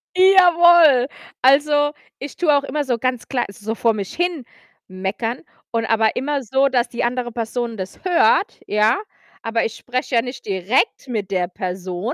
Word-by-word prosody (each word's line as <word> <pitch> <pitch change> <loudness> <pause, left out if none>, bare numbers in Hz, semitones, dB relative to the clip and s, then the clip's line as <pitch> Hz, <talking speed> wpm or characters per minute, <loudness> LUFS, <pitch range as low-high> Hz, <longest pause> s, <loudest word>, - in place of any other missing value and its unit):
Jawoll. 345 -7 +6 0.3
Also, 290 +2 +3 0.3
ich 280 +1 -8
tue 310 -5 +3
auch 280 - +1
immer 295 +1 -2
so 250 -4 -1
ganz 250 0 -2
klei 245 -3 -1
so 210 +2 -6
vor 230 0 +1
mich 200 -3 -5
hin 345 -6 -2 0.4
meckern 200 +6 -4 0.3
und 230 -1 -1
aber 220 -1 +1
immer 280 +1 -2
so, 265 +4 +2
dass 250 -2 +1
die 235 - -4
andere 240 0 -2
Person 230 0 -4
das 190 - -8
hört, 370 +3 +2
ja? 215 - +2 0.4
Aber 225 0 -1
ich 225 - -4
spreche 250 0 -4
ja 230 - +4
nicht 250 +2 -8
direkt 200 - 0
mit 210 -6 -4
der 180 -2 0
Person, 185 +3 -5
245 Hz, 170 wpm, -20 LUFS, 220-285 Hz, 0.4 s, Jawoll